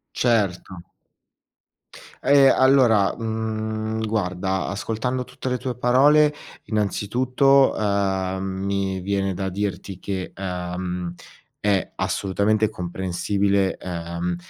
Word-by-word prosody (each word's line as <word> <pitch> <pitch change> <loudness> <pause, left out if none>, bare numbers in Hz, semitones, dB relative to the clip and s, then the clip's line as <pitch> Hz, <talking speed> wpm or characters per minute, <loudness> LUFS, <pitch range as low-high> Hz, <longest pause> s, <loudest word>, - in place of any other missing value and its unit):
Certo. 95 -6 0 1.4
Ehm, 140 -1 +6
allora, 130 -7 +4
mhmm, 110 0 -3
guarda, 95 -3 -1
ascoltando 115 +5 -2
tutte 125 +1 -6
le 125 - 0
tue 125 0 -4
parole, 145 +5 +4 0.3
innanzitutto, 125 +6 +2
ehm, 95 -2 0
mi 95 0 -2
viene 95 0 -1
da 95 +1 -2
dirti 100 -1 -4
che, 95 -1 -4
ehm, 90 -1 -4 0.5
è 100 -2 0
assolutamente 105 +2 0
comprensibile, 95 +1 -1
ehm, 85 0 -4
100 Hz, 90 wpm, -23 LUFS, 95-115 Hz, 1.4 s, Ehm